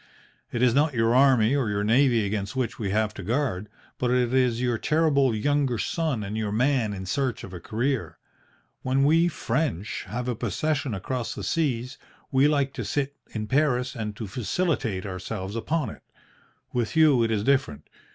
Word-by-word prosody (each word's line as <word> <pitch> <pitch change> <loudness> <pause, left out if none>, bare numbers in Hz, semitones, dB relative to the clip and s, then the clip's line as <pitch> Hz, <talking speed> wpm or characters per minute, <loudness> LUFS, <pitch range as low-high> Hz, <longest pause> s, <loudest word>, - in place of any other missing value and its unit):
It 120 - 0
is 125 -2 +4
not 145 +1 +2
your 115 0 +2
army 130 -2 +5
or 130 -6 0
your 105 0 -1
navy 120 0 +3
against 100 +1 -3
which 125 -3 -2
we 100 -3 -2
have 105 +1 0
to 105 - -8
guard, 105 -2 -1 0.3
but 125 - +1
it 125 -1 +2
is 125 -3 +2
your 120 -2 0
terrible 140 -6 +2
younger 135 +2 +1
son 155 -2 -1
and 100 +2 -5
your 110 -2 -2
man 120 0 +1
in 95 -2 -6
search 125 +5 -1
of 95 - -9
a 90 - -6
career. 125 +7 -2 0.6
When 135 +1 +1
we 165 +4 +4
French 120 - -2
have 120 +6 -4
a 125 - 0
possession 125 +3 -1
across 120 +5 -3
the - - -6
seas, 130 -6 -1 0.3
we 135 +1 +4
like 140 -2 +1
to - - -4
sit 140 -1 -2
in 110 -1 -4
Paris 130 0 +1
and 105 -3 -4
to 110 - -5
felicitate 120 - -1
ourselves 95 +1 -5
upon 145 +1 -1
it. - - -13 0.7
With 120 +1 -1
you 155 -6 +5
it 115 - +2
is 105 -2 0
different. 130 - 0
125 Hz, 180 wpm, -26 LUFS, 110-140 Hz, 0.7 s, army